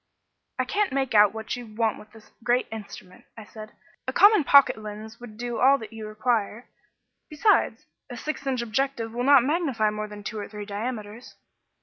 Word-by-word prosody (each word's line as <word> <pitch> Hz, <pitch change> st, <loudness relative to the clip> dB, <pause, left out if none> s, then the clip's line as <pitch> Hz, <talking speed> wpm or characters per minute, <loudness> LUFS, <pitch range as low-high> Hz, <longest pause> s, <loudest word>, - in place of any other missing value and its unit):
"I -, -, 0 dB
can't 415 Hz, 0 st, 0 dB
make 265 Hz, -2 st, -1 dB
out 210 Hz, -1 st, +6 dB
what 220 Hz, 0 st, -5 dB
you 245 Hz, -1 st, -9 dB
want 225 Hz, -1 st, 0 dB
with 210 Hz, -, -15 dB
this 220 Hz, -1 st, -18 dB
great 245 Hz, +2 st, +1 dB
instrument," 200 Hz, -4 st, -10 dB
I 220 Hz, -, -9 dB
said. 215 Hz, 0 st, -11 dB, 0.3 s
"A -, -, 0 dB
common 410 Hz, -4 st, +6 dB
pocket 280 Hz, +1 st, +6 dB
lens 215 Hz, +1 st, -9 dB
would 230 Hz, -3 st, -11 dB
do 240 Hz, 0 st, -4 dB
all 270 Hz, +2 st, +5 dB
that 225 Hz, -3 st, -10 dB
you 220 Hz, -1 st, -7 dB
require. 220 Hz, +1 st, -2 dB, 0.6 s
Besides, 330 Hz, +8 st, +1 dB, 0.2 s
a 245 Hz, -, -7 dB
six 290 Hz, +2 st, -5 dB
inch 255 Hz, -3 st, -1 dB
objective 235 Hz, 0 st, -2 dB
will 245 Hz, +1 st, -2 dB
not 275 Hz, -2 st, +6 dB
magnify 270 Hz, -8 st, 0 dB
more 215 Hz, 0 st, -4 dB
than 210 Hz, 0 st, -10 dB
two 220 Hz, +1 st, -5 dB
or 205 Hz, -, -6 dB
three 210 Hz, 0 st, -8 dB
diameters." 215 Hz, +2 st, -6 dB
225 Hz, 190 wpm, -25 LUFS, 215-260 Hz, 0.6 s, out